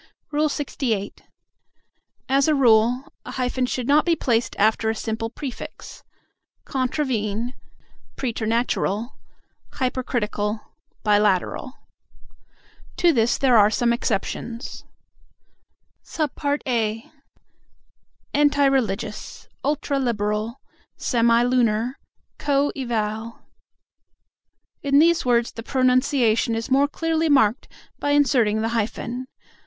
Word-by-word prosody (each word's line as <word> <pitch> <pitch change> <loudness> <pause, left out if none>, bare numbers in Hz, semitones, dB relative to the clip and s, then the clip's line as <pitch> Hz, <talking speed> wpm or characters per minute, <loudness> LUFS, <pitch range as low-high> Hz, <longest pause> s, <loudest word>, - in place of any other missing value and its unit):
LXVIII. 280 -8 -1 1.1
As 275 +2 +3
a 310 - +3
rule, 245 +2 +3
a - - -8
hyphen 255 0 -1
should 250 -1 -3
not 295 +2 +5
be 340 -1 +2
placed 235 -6 0
after 220 +1 +2
a 220 - 0
simple 225 +1 -3
prefix: 260 +1 -8 0.6
"contravene," 245 -4 -1 0.6
"preternatural," 230 -2 -1 0.6
"hypercritical," 225 -5 -2 0.4
"bilateral." 210 +3 +1 1.2
To 345 -2 +4
this 235 -2 +2
there 260 -3 +3
are 210 -2 +6
some 235 +1 +1
exceptions: 235 +1 -3 1.3
(a) 255 -7 -1 1.3
"Anti 285 -1 +3
religious," 220 -6 -1 0.2
"ultra 285 -1 0
liberal," 215 -1 -1 0.4
"semi 235 -1 +3
lunar," 245 0 +1 0.4
"co 285 0 +1
eval." 225 -3 -3 1.4
In 280 0 +2
these 325 -2 +4
words 240 -1 +2
the 230 - -8
pronunciation 255 -3 +2
is 225 +4 -4
more 275 +2 +4
clearly 325 +1 -1
marked 245 -4 +3 0.3
by 290 - -1
inserting 235 -7 +3
the 225 - 0
hyphen. 235 +2 -3
245 Hz, 95 wpm, -23 LUFS, 220-275 Hz, 1.4 s, are